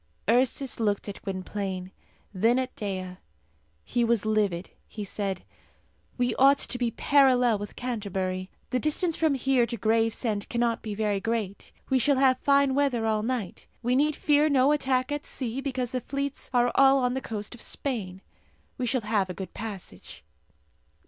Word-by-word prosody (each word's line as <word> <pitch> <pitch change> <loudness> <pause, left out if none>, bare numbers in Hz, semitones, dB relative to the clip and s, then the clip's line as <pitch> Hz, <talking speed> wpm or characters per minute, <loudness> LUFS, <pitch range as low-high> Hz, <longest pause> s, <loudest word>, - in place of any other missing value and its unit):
Ursus 255 +3 +2
looked 205 -2 0
at 200 - -7
Gwynplaine, 190 -1 -4 0.4
then 225 +6 +3
at 260 0 -2
Dea. 185 -3 -4 0.7
He 240 0 0
was 230 -2 +1
livid. 205 -5 0 0.2
He 210 - -6
said, 195 -2 -3 0.7
"We 245 -1 +1
ought 275 +1 +6
to 250 - -2
be 240 -1 +1
parallel 250 -3 +3
with 205 0 -7
Canterbury. 190 -6 -3 0.2
The 255 - +1
distance 310 +3 0
from 315 -3 +2
here 260 -2 +2
to 235 0 -4
Gravesend 225 -1 0
cannot 235 -1 0
be 215 -2 -5
very 210 -2 0
great. 215 -2 -3 0.2
We 260 - +4
shall 280 +2 +3
have 260 -1 +4
fine 280 -1 +3
weather 265 -5 +1
all 215 -1 +1
night. 230 -4 -4 0.2
We 245 +2 +2
need 295 +2 +2
fear 300 +1 +3
no 275 0 +4
attack 260 -2 +1
at 290 0 -2
sea, 255 0 -4
because 255 -3 -3
the 255 - -2
fleets 275 +2 -4
are 245 -1 +3
all 270 0 +6
on 250 -2 +1
the 265 - -2
coast 210 -2 -5
of 240 - -9
Spain. 195 -9 -3 0.6
We 250 - -1
shall 255 +1 +1
have 210 -3 0
a 180 - -5
good 190 +1 -7
passage." 195 - -8
235 Hz, 170 wpm, -27 LUFS, 205-265 Hz, 0.7 s, ought